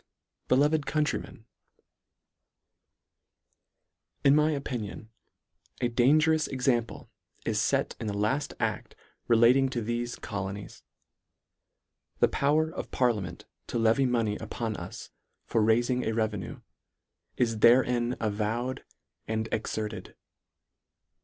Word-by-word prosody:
Beloved 145 +3 +3
Countrymen, 150 -7 -2 2.8
IN 140 +1 +6
my 150 +1 +4
opinion, 120 -7 -4 0.7
a 120 - +1
dangerous 155 +6 +3
example 125 -3 -1 0.3
is - - +1
fet - - 0
in 110 - -4
the 100 - -2
lafl 125 +8 0
ad: - - -2 0.3
relating 120 +3 +5
to 130 - -2
thefe 120 +1 -3
colo 100 -3 -4
nies. 100 0 -10 1.4
The - - +5
power 155 +3 +1
of - - -6
parliament 105 -8 -1 0.2
to - - -3
levy 115 +4 +3
money 115 -4 0
upon 115 -2 -4
us - - -8 0.3
for 115 - +1
railing 120 +3 +2
a 110 - -1
revenue, 110 -4 -2 0.8
is 115 -3 +1
therein 120 +1 +4
avowed 115 +4 -2 0.4
and 110 0 -1
exerted. 110 -2 -4
120 Hz, 105 wpm, -28 LUFS, 110-130 Hz, 2.8 s, IN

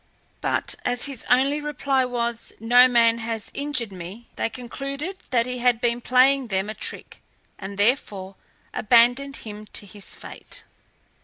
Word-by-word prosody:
But - - -1
as 245 0 +1
his 275 -5 -6
only 275 +4 +3
reply 280 -3 0
was, 235 -2 -3
"Noman 235 0 +5
has 225 -2 -4
injured 280 -7 -1
me," 190 +6 -9
they - - -1
concluded 275 - -6
that 235 -3 +2
he 250 0 -4
had 245 -1 +3
been 240 0 0
playing 255 +2 +4
them 195 0 -1
a - - -6
trick, - - -6 0.4
and 195 0 -7
therefore 205 -4 0 0.4
abandoned 245 +5 +4
him 215 -1 -8
to 205 - -6
his 200 0 -6
fate. - - -11
240 Hz, 145 wpm, -24 LUFS, 220-265 Hz, 0.4 s, Noman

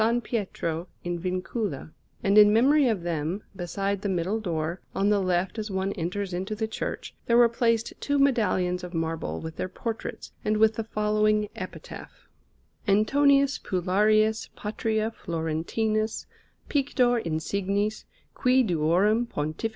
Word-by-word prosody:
Pietro 180 -6 -3 0.2
in 175 0 -3
Vincula; 185 - -3 0.3
and 200 +1 +3
in 210 -1 +8
memory 270 +6 +5
of 210 -7 0
them, 170 +3 -2
beside 195 +2 -2
the 200 - -2
middle 190 +4 0
door, 170 -3 -3
on 200 +1 +2
the 205 -1 +3
left 185 +3 0
as 215 0 -4
one 190 0 -1
enters 185 +2 -3
into 190 +4 -3
the 220 +1 -2
church, 220 - -5
there 235 - +4
were 240 -1 +7
placed 230 -1 0
two 285 0 0
medallions 210 -10 +2
of 180 -1 -7
marble 165 0 -2
with 160 0 -7
their 185 - -3
portraits 225 +3 -5
and 215 0 +1
with 220 0 +5
the 225 - -3
following 215 -1 +1
epitaph: - - -9 0.6
ANTONIUS 275 +7 +4
PULLARIUS 215 +4 +2
PATRIA 220 +1 -1
FLORENTINUS, 200 +6 -2 0.4
PICTOR 255 -4 +2
INSIGNIS, 200 +5 -1 0.3
QUI 255 0 +3
DUORUM 190 +6 +2
PONTIF. 155 +5 -3
205 Hz, 135 wpm, -26 LUFS, 180-225 Hz, 0.6 s, in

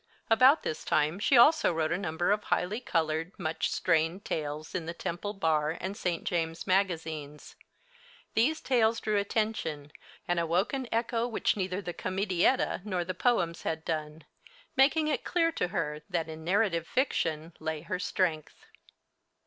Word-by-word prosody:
About 255 +7 +6
this 155 - -3
time 155 +5 +1
she 255 +5 +4
also 310 - +6
wrote 160 -1 -1
a - - +2
number 175 0 0
of 210 0 0
highly 205 +6 0
colored, 165 -4 -1
much 160 -4 -1
strained 165 +3 +1
tales 150 0 -4
in 170 -3 -3
the 170 - -4
Temple 175 +4 -4
Bar 160 -4 0
and 190 +2 -4
St. 180 -5 -2
James' 165 -1 -2
magazines. 160 -6 -1 0.8
These 285 +8 +2
tales 230 -3 +2
drew 215 -1 0
attention, 200 -8 -2 0.4
and 175 -1 +1
awoke 170 - +1
an 265 -2 -2
echo 230 +1 0
which 235 - 0
neither 190 0 -2
the 175 - -4
comedietta 190 +6 +1
nor 185 -4 -2
the 185 - -3
poems 180 -5 +1
had 160 0 -3
done, 155 -1 -3 0.5
making 290 +4 +4
it 290 -5 -1
clear 330 -2 +1
to 180 - -1
her 160 -5 -3
that 170 -4 -1
in 160 0 -8
narrative 180 -2 +1
fiction 165 - -1
lay 155 -1 -3
her 180 +3 -4
strength. 175 -4 -2
175 Hz, 155 wpm, -29 LUFS, 160-215 Hz, 0.8 s, About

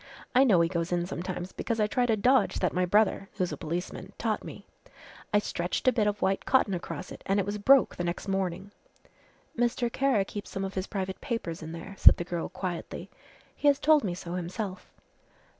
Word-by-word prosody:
I 255 +2 +6
know 200 -10 +5
he 165 - +3
goes 170 0 -2
in 175 -1 +1
sometimes 180 0 -5
because 230 -1 -3
I 210 - +4
tried 245 +3 0
a 220 - +3
dodge 250 +1 +3
that - - 0
my 180 0 +1
brother 205 0 +2
who's 185 -4 -1
a - - -3
policeman 170 +3 -5
taught - - -1
me. - - -9 0.7
I 210 - +4
stretched 180 0 -2
a - - +8
bit 215 -4 +1
of 205 0 -1
white 195 0 +1
cotton 255 -7 +3
across 180 +1 -5
it - - -9
an' 195 - +2
it 200 - +1
was 205 +1 -3
broke 270 +6 +5
the 175 - -2
next 175 +3 -3
morning." 190 0 -2 0.8
"Mr. 240 0 0
Kara 265 -8 +2
keeps 205 +1 -7
some 195 0 -3
of 190 - -5
his 190 0 -3
private 190 -2 -4
papers 230 - -4
in 160 0 -7
there," 170 +4 -8
said - - +8
the - - -2
girl 170 -1 -4
quietly, 180 -3 -5 0.4
"he 295 - 0
has 285 -1 +6
told 305 -1 +4
me 180 -4 -2
so 175 -1 -7
himself." 185 +2 -5
195 Hz, 210 wpm, -28 LUFS, 175-220 Hz, 0.8 s, a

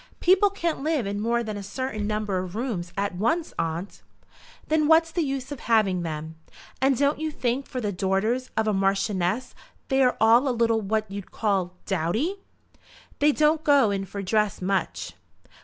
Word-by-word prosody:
"People 375 +3 +5
can't 340 -7 -2
live 300 -5 0
in 200 +1 -3
more 235 +2 0
than 215 -2 -5
a - - -5
certain 215 +1 -4
number 210 -3 -1
of 180 +1 -6
rooms 215 -8 -3
at 200 0 -1
once, 310 - 0
aunt." 165 +4 -3 0.7
"Then 310 -1 +2
what's 325 +1 +5
the 345 - 0
use 270 -2 -3
of 285 - -5
having 215 -7 +2
them? 160 -1 -5 0.4
And 265 -1 +3
don't 285 +2 +2
you 315 0 -1
think 260 -2 -2
for 255 - -4
the 210 -4 -2
daughters 200 +7 0
of 220 0 +1
a 215 - +2
Marchioness 195 +2 0 0.4
they 270 -1 +3
are 250 -1 +3
a 225 +2 +6
little 235 -4 +1
what 215 +1 -1
you'd 200 -1 -7
call 190 -4 -1
dowdy?" 205 - -1 0.8
"They 295 +1 +5
don't 305 +1 +2
go 280 -8 +4
in 195 -1 -2
for 195 +1 -6
dress 210 +1 +1
much." 195 +1 -2
220 Hz, 175 wpm, -25 LUFS, 195-275 Hz, 0.8 s, a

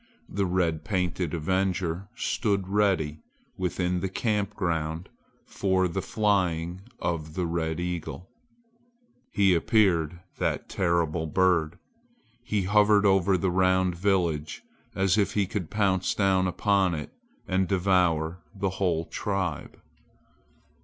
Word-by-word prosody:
The 100 -1 -1
red 85 -4 0
painted 90 -3 -1
avenger 95 +1 -1
stood 100 -5 -1
ready 95 -7 +1 0.4
within 90 -1 -1
the 95 - -2
camp 105 0 -1
ground 80 -3 -2 0.4
for 95 -2 +1
the 95 +2 -3
flying 95 -4 0 0.2
of 80 -2 -3
the 90 - -1
red 80 -1 -2
eagle. 90 +1 -4 1.0
He 100 -2 +4
appeared, 85 -3 +2 0.2
that - - -1
terrible 85 -3 0
bird! 85 -1 +2 0.7
He 105 -4 -1
hovered 105 +1 +4
over 95 -1 +4
the 95 0 0
round 95 0 +2
village 85 - -1 0.3
as 95 +1 +2
if 100 - 0
he 100 -2 +2
could 95 -3 -4
pounce 95 -3 +1
down 95 -2 +2
upon 95 -1 +1
it 75 - -7 0.3
and 95 0 +1
devour 90 -3 +1 0.2
the 100 -1 -1
whole 85 -3 +1
tribe. 95 -7 -3
95 Hz, 120 wpm, -27 LUFS, 85-95 Hz, 1.0 s, He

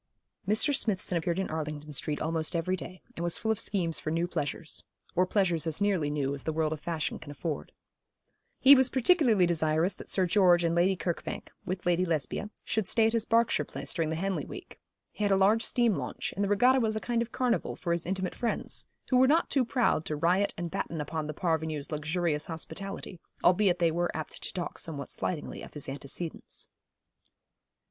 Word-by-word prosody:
Mr. 225 +8 +3
Smithson 190 -7 +1
appeared 170 +1 0
in 190 -3 -2
Arlington 150 -1 -4
Street 150 +1 -1
almost 160 +1 -1
every 170 +3 0
day, 185 0 -9
and - - -5
was 175 0 +2
full 220 - 0
of 220 - -1
schemes 170 -5 0
for - - -4
new 165 +2 0
pleasures 155 -1 -3 0.3
or 180 +1 +3
pleasures 175 -5 +1
as 160 +1 0
nearly 195 -7 +1
new 140 -2 -1
as 140 - -5
the 160 - -2
world 155 0 0
of 155 - -6
fashion 160 -1 -2
can 155 - -11
afford. 145 +1 -4 0.9
He 275 - +9
was 260 -2 +6
particularly 255 - +4
desirous 160 +2 +1
that - - -12
Sir 190 - +2
George 175 -2 +4
and 165 0 +1
Lady 180 +3 +3
Kirkbank, 175 -1 -4 0.2
with 185 0 -3
Lady 175 0 +3
Lesbia, 165 +4 -1 0.2
should 220 -4 -1
stay 225 +2 +3
at 225 - +2
his 230 -1 0
Berkshire 230 0 +3
place - - -4
during 165 -3 0
the 160 - -1
Henley 190 +3 -1
week. - - -10 0.3
He 210 - -4
had 205 - +3
a 195 - +5
large 205 +4 +4
steam 235 -2 +2
launch, - - -4
and 200 - 0
the 200 - 0
regatta 250 +6 +5
was 220 -3 +1
a - - 0
kind 235 +1 -1
of 235 0 -3
carnival 250 -2 0
for 170 - -3
his 170 0 -1
intimate 190 0 -2
friends, 235 - -2 0.2
who 255 - +5
were 260 +1 +6
not 320 +5 +3
too 270 - +3
proud 235 - +1
to 155 - -1
riot 180 +6 +2
and 170 -1 -4
batten 160 +1 -3
upon 150 +1 -3
the 155 - -4
parvenu's 160 -4 -1
luxurious 155 0 -1
hospitality, 185 +2 -5 0.2
albeit 180 0 +4
they 170 -2 +2
were 175 +2 0
apt 155 - -6
to - - -4
talk 175 -2 -4
somewhat 145 -4 -3
slightingly 165 -5 -3
of - - -11
his 150 - -5
antecedents. 140 +5 -4
175 Hz, 205 wpm, -29 LUFS, 160-205 Hz, 0.9 s, He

